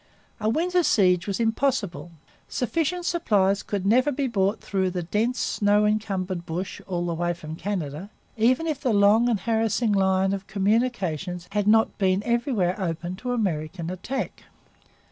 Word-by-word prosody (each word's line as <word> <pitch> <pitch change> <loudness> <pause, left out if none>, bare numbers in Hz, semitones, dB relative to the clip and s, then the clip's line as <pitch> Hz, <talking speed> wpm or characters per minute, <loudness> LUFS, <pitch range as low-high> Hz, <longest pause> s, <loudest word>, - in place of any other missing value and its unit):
A 215 0 0
winter 355 +8 +2
siege 185 - +3
was 200 +1 -2
impossible. 225 -6 0 0.4
Sufficient 335 +7 -1
supplies 205 - +2
could 200 -2 -3
never 255 +8 +4
be 280 0 -1
brought 205 -4 0
through 190 -2 -1
the 180 -1 -3
dense, 220 +8 0
snow 205 0 +2
encumbered 195 -4 -1
bush, 175 +3 -5
all 175 -2 -2
the 170 - -1
way 175 +1 -1
from 160 -2 -8
Canada, 175 -2 -4 0.3
even 250 +7 +2
if 305 -3 -2
the 250 -5 +1
long 210 +4 +5
and 215 -5 0
harassing 225 +1 +1
line 190 -1 +2
of 195 0 -5
communications 195 - -1
had 205 0 0
not 220 +1 +4
been 190 0 +2
everywhere 235 -6 0
open 175 0 -3
to 250 +4 -4
American 170 -6 -2
attack. 240 +9 -5
205 Hz, 155 wpm, -25 LUFS, 185-235 Hz, 0.4 s, long